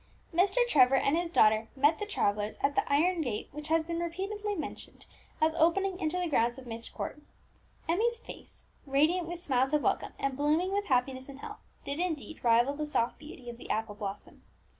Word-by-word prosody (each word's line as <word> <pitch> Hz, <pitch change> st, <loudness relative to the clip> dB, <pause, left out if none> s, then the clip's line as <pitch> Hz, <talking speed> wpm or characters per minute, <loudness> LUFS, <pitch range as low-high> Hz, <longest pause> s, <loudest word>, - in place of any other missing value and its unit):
Mr. 400 Hz, +8 st, +3 dB
Trevor 270 Hz, -, +5 dB
and 275 Hz, +3 st, +2 dB
his 345 Hz, 0 st, -1 dB
daughter 220 Hz, -8 st, +4 dB
met 290 Hz, +3 st, +3 dB
the 420 Hz, -, -3 dB
travellers 210 Hz, -, -1 dB
at 280 Hz, -, +2 dB
the -, -, 0 dB
iron 335 Hz, +4 st, +3 dB
gate 240 Hz, -8 st, -3 dB
which 300 Hz, +1 st, -7 dB
has 320 Hz, 0 st, +2 dB
been 335 Hz, +1 st, -3 dB
repeatedly 395 Hz, +5 st, -3 dB
mentioned 320 Hz, -, -7 dB, 0.3 s
as 315 Hz, 0 st, +3 dB
opening 360 Hz, +4 st, +2 dB
into 325 Hz, 0 st, -1 dB
the 360 Hz, -1 st, 0 dB
grounds 240 Hz, -5 st, +1 dB
of 265 Hz, -, -10 dB
Myst 230 Hz, -1 st, -7 dB
Court. 300 Hz, -, -6 dB, 0.7 s
Emmie's 455 Hz, +8 st, +1 dB
face, -, -, -12 dB, 0.2 s
radiant 315 Hz, +6 st, +2 dB
with 345 Hz, 0 st, -5 dB
smiles 265 Hz, -2 st, +1 dB
of 300 Hz, -, +2 dB
welcome, -, -, 0 dB
and 275 Hz, -1 st, -1 dB
blooming 310 Hz, +7 st, +1 dB
with 405 Hz, 0 st, 0 dB
happiness 260 Hz, 0 st, 0 dB
and 275 Hz, 0 st, -10 dB
health, -, -, -8 dB, 0.3 s
did 280 Hz, +3 st, -3 dB
indeed 325 Hz, -3 st, -3 dB
rival 240 Hz, +3 st, +4 dB
the 300 Hz, +1 st, -3 dB
soft 240 Hz, -5 st, 0 dB
beauty 300 Hz, -4 st, -11 dB
of 240 Hz, 0 st, -7 dB
the -, -, -11 dB
apple 220 Hz, -1 st, -1 dB
blossom. 205 Hz, -1 st, -7 dB
300 Hz, 195 wpm, -30 LUFS, 255-350 Hz, 0.7 s, Trevor